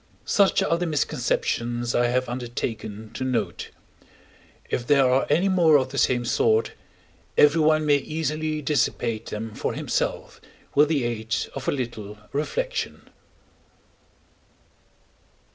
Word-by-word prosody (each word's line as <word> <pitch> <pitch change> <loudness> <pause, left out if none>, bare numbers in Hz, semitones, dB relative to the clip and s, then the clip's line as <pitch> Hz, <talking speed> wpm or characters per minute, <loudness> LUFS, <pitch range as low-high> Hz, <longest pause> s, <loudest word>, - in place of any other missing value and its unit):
Such 200 -2 +3
are 170 - +1
the 175 - -1
misconceptions 120 -5 -1
I 120 - +3
have 125 +1 0
undertaken 115 -3 -5
to 130 - -4
note; 130 -2 -2 1.0
if 120 - -3
there 140 -2 +5
are 130 +1 +2
any 165 +7 +3
more 170 -5 +5
of 130 -1 -1
the 140 +1 -3
same 120 -2 +2
sort, 110 -1 +2 0.7
everyone 155 +1 +4
may 145 -1 +5
easily 155 +1 -3
dissipate 120 -6 0
them 110 +1 -5
for - - -3
himself - - -3 0.3
with 150 +1 +4
the 145 -5 +1
aid 115 -1 -2 0.2
of 135 -1 -6
a - - +3
little 110 -6 -5 0.2
reflection. - - -3
130 Hz, 125 wpm, -24 LUFS, 120-155 Hz, 1.0 s, there